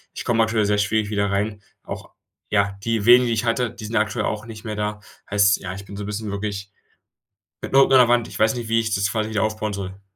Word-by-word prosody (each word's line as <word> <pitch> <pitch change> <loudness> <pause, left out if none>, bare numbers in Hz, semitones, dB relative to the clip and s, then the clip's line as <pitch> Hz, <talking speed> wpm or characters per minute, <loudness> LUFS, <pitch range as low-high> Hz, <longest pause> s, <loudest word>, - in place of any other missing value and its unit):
ich - - -6
komme 115 -1 +1
natürlich 110 -2 +2
sehr 105 0 +2
schwierig 105 0 0
wieder 100 -1 0
rein. 105 +1 -1 0.2
Auch - - -8 0.4
ja, 100 -1 +1
die 115 -2 -1
wenigen, 125 +1 +7
die 115 - +1
ich 115 +2 -1
hatte, 115 +1 +1
die 110 - -9
sind 115 +2 -5
aktuell 110 +1 0
auch 110 +1 -3
nicht 110 -1 -10
mehr 105 -1 -4
da. 105 0 -3 0.3
Heißt, 100 -1 +4
ja, 95 -1 -6
ich 100 0 -9
bin 100 - -10
so 105 - -5
'n - - -6
bisschen 105 0 -4
wirklich 100 -1 -4 0.9
mit - - -6
dem 135 - +7
Rücken 135 - +4
an 130 - +8
der 120 - +6
Wand. 120 -1 +3
Ich - - -8
weiß 110 +3 +3
nicht, 115 -2 -5
wie 115 0 +3
ich 110 -2 -1
das 100 0 +1
quasi 110 -1 -1
wieder 105 -1 0
aufbauen 110 -1 -2
soll. 95 0 -6
105 Hz, 265 wpm, -22 LUFS, 100-115 Hz, 0.9 s, an